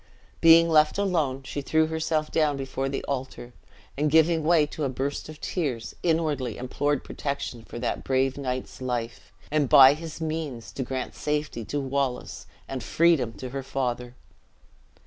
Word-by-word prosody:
Being 165 0 +8
left 155 0 +4
alone, 160 -10 0
she 145 - -5
threw 160 +3 +2
herself 160 -1 -1
down 150 -3 +2
before 135 0 -3
the 135 - -3
altar, 130 -2 -5 0.4
and 150 +2 +1
giving 160 +1 +4
way 160 -1 +4
to 150 +1 -6
a 135 - +1
burst 135 +4 -3
of 155 -1 -10
tears, 130 -10 -3
inwardly 155 -8 0
implored 145 +3 -1
protection 140 -5 -4
for 120 - -9
that - - -2
brave 130 0 +1
knight's 130 -2 -4
life; 120 -2 -4 0.2
and 150 -3 +1
by 135 -2 +9
his 160 +1 -8
means 155 -7 -4
to - - -5
grant 130 0 -4
safety 150 -5 -2
to 145 - -2
Wallace, 135 -2 -3 0.2
and 130 -1 -4
freedom 160 -9 +2
to 130 - -7
her 135 +2 -4
father! 125 -2 -3
140 Hz, 160 wpm, -26 LUFS, 130-155 Hz, 0.4 s, by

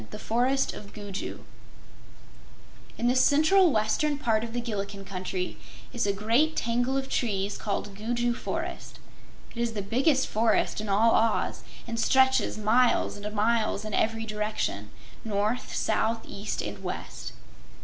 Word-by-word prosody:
7. 110 - -13
The - - -7
Forest 250 +5 +1
of 205 -1 -10
Gugu 205 -2 -6 1.6
In 235 - 0
the 250 - +3
central 315 +7 +5
western 245 +7 +1
part 225 -5 +1
of 230 - -5
the 240 - -2
Gillikin 200 -4 -4
Country 185 -1 -4 0.4
is 235 -4 0
a - - +3
great 230 +11 +2
tangle 245 +3 0
of 270 0 -2
trees 200 -6 -1
called 205 -1 -3
Gugu 240 +3 0
Forest. - - -5 0.5
It - - -14
is 235 -1 0
the 205 -2 -3
biggest 265 +6 +2
forest 220 -1 +1
in 215 - -5
all 220 +4 +4
Oz 225 0 +1 0.2
and 230 -1 -4
stretches 265 0 +3
miles 230 +4 +3
and 205 +1 -6
miles 215 0 +1
in 215 - -5
every 225 +1 +1
direction 210 - -2 0.3
north, 215 +2 -1
south, 225 +1 +1
east 205 +2 -4
and - - -6
west. - - -6
225 Hz, 150 wpm, -27 LUFS, 210-245 Hz, 1.6 s, central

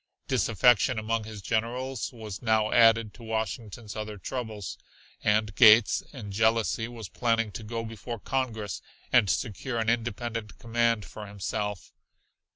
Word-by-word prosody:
Disaffection 120 +2 +3
among 110 0 -1
his 110 -2 -9
generals 120 +4 -2
was 110 -5 -8
now 110 -2 +2
added 115 -2 +5
to - - -15
Washington's 110 -1 -4
other 105 -1 -5
troubles, 110 -3 -5 0.4
and 105 0 +2
Gates, 110 0 +7
in 110 -8 -8
jealousy, 110 +2 +1
was 115 -4 -8
planning 115 +2 0
to 110 - -7
go 115 +1 -4
before 115 +1 -6
Congress 110 -5 -3 0.3
and 100 - +5
secure 120 +4 -2
an 110 -1 +1
independent 115 -1 -2
command 115 -2 +1
for 105 -1 -9
himself. 105 0 -4
110 Hz, 135 wpm, -28 LUFS, 105-115 Hz, 0.4 s, Gates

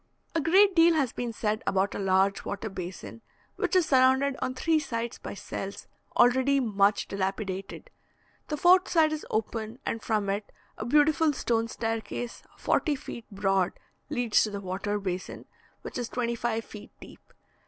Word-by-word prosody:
A 325 - +1
great 385 +5 +5
deal 335 0 +6
has 275 -6 +1
been 240 -1 -3
said 215 -1 -1
about 195 +1 +1
a - - -4
large 195 0 +2
water 205 +2 -4
basin, 190 +4 -7 0.3
which - - -1
is 365 -3 +5
surrounded 265 0 +4
on 255 - -2
three 320 +4 +2
sides 235 -5 -4
by - - -7
cells, 195 0 -6 0.3
already 260 +3 +4
much 205 -4 +2
dilapidated; 195 - -4 0.6
the 300 - -3
fourth 365 +4 +5
side 315 -3 +3
is 310 - -5
open, 220 +1 -3
and 225 - -2
from 215 -3 0
it 200 +1 -3 0.2
a 220 - -6
beautiful 300 +3 +3
stone 230 -3 0
staircase, 225 +1 -4 0.2
forty 300 -3 +1
feet 235 -4 -8
broad, 195 -2 +1 0.4
leads 245 -6 +2
to 215 - +1
the 200 -1 -5
water 195 +2 -3
basin, 185 -2 -5 0.4
which - - -5
is 240 - -3
twenty 235 -1 -1
five 230 -1 -2
feet 210 - -11
deep. - - -15
230 Hz, 165 wpm, -28 LUFS, 200-280 Hz, 0.6 s, deal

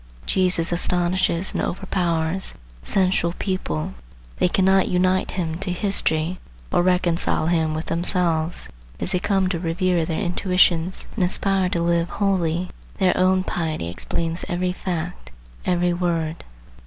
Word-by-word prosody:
Jesus 180 -3 +2
astonishes 175 +1 +1
and - - -1
overpowers 175 -1 0 0.3
sensual 185 - +1
people. 80 - -2 0.5
They - - +4
cannot 190 +1 +3
unite 185 +1 +1
him 165 -2 -2
to 190 -1 -1
history, 180 -3 +1 0.3
or - - +3
reconcile 180 -3 +2
him 160 -2 +1
with 155 - -3
themselves. 170 -1 0 0.3
As - - -2
they 180 - +1
come 195 0 +1
to 175 -3 -2
revere 175 0 +1
their 160 0 -2
intuitions 180 -2 +2
and 205 - +1
aspire 190 +1 +2
to 170 -1 -1
live 170 0 +1
holily, 180 -3 0 0.3
their 185 -2 +3
own 185 0 +3
piety 160 - -2
explains 165 - -3
every 180 +1 0
fact, 180 - -4 0.4
every 175 -1 +2
word. 170 -2 -2
180 Hz, 130 wpm, -22 LUFS, 165-185 Hz, 0.5 s, They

